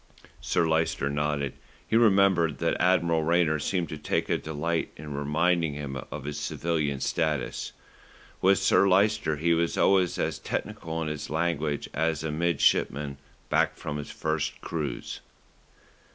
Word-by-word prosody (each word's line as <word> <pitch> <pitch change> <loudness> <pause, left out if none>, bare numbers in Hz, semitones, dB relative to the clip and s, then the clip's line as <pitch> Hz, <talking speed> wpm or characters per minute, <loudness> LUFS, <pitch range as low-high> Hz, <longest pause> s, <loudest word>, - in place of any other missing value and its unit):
Sir 85 - +1
Lyster 80 -3 +1
nodded. 75 -1 -1 0.3
He - - 0
remembered 95 -8 +4
that - - 0
Admiral 85 -2 +3
Rayner 80 -1 +2
seemed 90 +1 -1
to - - -6
take - - -1
a - - +2
delight 80 +2 -2
in 75 0 -7
reminding 80 +2 +1
him 70 -2 -5
of 75 - -6
his 75 0 -4
civilian 75 -5 -1
status. 75 -3 -1 0.7
With 95 +1 +5
Sir 100 0 +4
Lyster 100 -3 +3
he 85 +3 +2
was 85 0 0
always 95 -3 +3
as - - -1
technical 80 0 -4
in - - -3
his 75 -1 -5
language 80 -2 -1
as 80 -1 0
a 80 - -2
midshipman 75 -3 +1 0.3
back - - +2
from 75 - -4
his 75 - -6
first 80 -1 -2
cruise. 75 -4 -4
80 Hz, 145 wpm, -27 LUFS, 75-85 Hz, 0.7 s, With